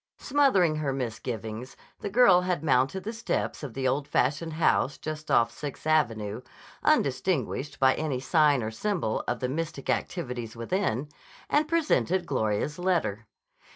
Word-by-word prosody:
Smothering 255 Hz, -, +3 dB
her 150 Hz, -3 st, -1 dB
misgivings, 115 Hz, -1 st, -5 dB, 0.2 s
the -, -, -4 dB
girl 195 Hz, -5 st, +6 dB
had 180 Hz, -4 st, -1 dB
mounted 135 Hz, +5 st, +2 dB
the 220 Hz, -, -4 dB
steps 230 Hz, 0 st, -2 dB
of 140 Hz, -7 st, -7 dB
the 130 Hz, -1 st, 0 dB
old 140 Hz, +3 st, 0 dB
fashioned 155 Hz, +5 st, 0 dB
house 155 Hz, -3 st, +2 dB
just 155 Hz, 0 st, -6 dB
off 115 Hz, 0 st, +4 dB
Sixth 140 Hz, +5 st, -7 dB
Avenue, 115 Hz, -8 st, +1 dB, 0.4 s
undistinguished 140 Hz, -, 0 dB
by 130 Hz, -1 st, +5 dB
any 150 Hz, -5 st, -2 dB
sign 145 Hz, -2 st, +3 dB
or 110 Hz, -, -3 dB
symbol 170 Hz, -, -1 dB
of 120 Hz, -1 st, -2 dB
the 125 Hz, -, 0 dB
mystic 150 Hz, 0 st, -3 dB
activities 125 Hz, -9 st, -3 dB
within, 130 Hz, -, -1 dB, 0.4 s
and 295 Hz, +1 st, +3 dB
presented 295 Hz, -, +1 dB
Gloria's 130 Hz, +2 st, -1 dB
letter. 160 Hz, -, 0 dB
145 Hz, 145 wpm, -27 LUFS, 125-175 Hz, 0.4 s, girl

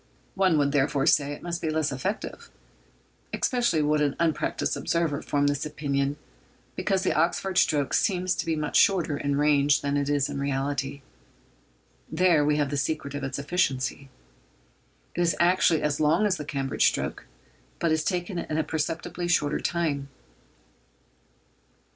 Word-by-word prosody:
One 190 Hz, -4 st, +3 dB
would, 140 Hz, -1 st, +2 dB
therefore, 140 Hz, -1 st, +1 dB
say 145 Hz, -1 st, +3 dB
it 145 Hz, -, -8 dB
must 170 Hz, -1 st, -4 dB
be 160 Hz, -, -1 dB
less 155 Hz, -1 st, 0 dB
effective. 185 Hz, +11 st, -4 dB, 0.8 s
Especially 240 Hz, -, +1 dB
would 150 Hz, 0 st, +2 dB
an 145 Hz, -2 st, +1 dB
unpractised 165 Hz, -3 st, 0 dB
observer 165 Hz, -4 st, -1 dB
form 145 Hz, 0 st, 0 dB
this 145 Hz, 0 st, 0 dB
opinion, 140 Hz, -2 st, -2 dB, 0.6 s
because 190 Hz, -2 st, 0 dB
the -, -, +1 dB
Oxford 175 Hz, +4 st, 0 dB
stroke 145 Hz, -3 st, +1 dB
seems 185 Hz, -3 st, +1 dB
to -, -, -4 dB
be 165 Hz, -, +1 dB
much 150 Hz, -1 st, 0 dB
shorter 175 Hz, -6 st, +3 dB
in 140 Hz, 0 st, -1 dB
range 145 Hz, -1 st, +3 dB
than 140 Hz, 0 st, -1 dB
it 140 Hz, 0 st, -1 dB
is 145 Hz, -2 st, +1 dB
in -, -, -5 dB
reality. 140 Hz, 0 st, -2 dB, 1.1 s
There 165 Hz, -2 st, +3 dB
we 150 Hz, 0 st, +2 dB
have 145 Hz, -1 st, 0 dB
the 145 Hz, -, -1 dB
secret 140 Hz, 0 st, -2 dB
of 145 Hz, -1 st, -5 dB
its 135 Hz, 0 st, -3 dB
efficiency. 140 Hz, -3 st, -1 dB, 1.0 s
It 175 Hz, -, -2 dB
is 170 Hz, -1 st, +2 dB
actually 175 Hz, -2 st, +3 dB
as 150 Hz, -1 st, 0 dB
long 155 Hz, +7 st, +3 dB
as 195 Hz, -3 st, +1 dB
the 150 Hz, -, -6 dB
Cambridge 135 Hz, -2 st, +1 dB
stroke, -, -, -3 dB, 0.5 s
but 170 Hz, -, 0 dB
is 155 Hz, 0 st, +1 dB
taken 180 Hz, 0 st, -2 dB
in 155 Hz, -, -3 dB
a 160 Hz, -, +2 dB
perceptibly 165 Hz, +3 st, -3 dB
shorter 150 Hz, -4 st, +1 dB
time. 155 Hz, -4 st, -1 dB
150 Hz, 160 wpm, -26 LUFS, 140-170 Hz, 1.1 s, One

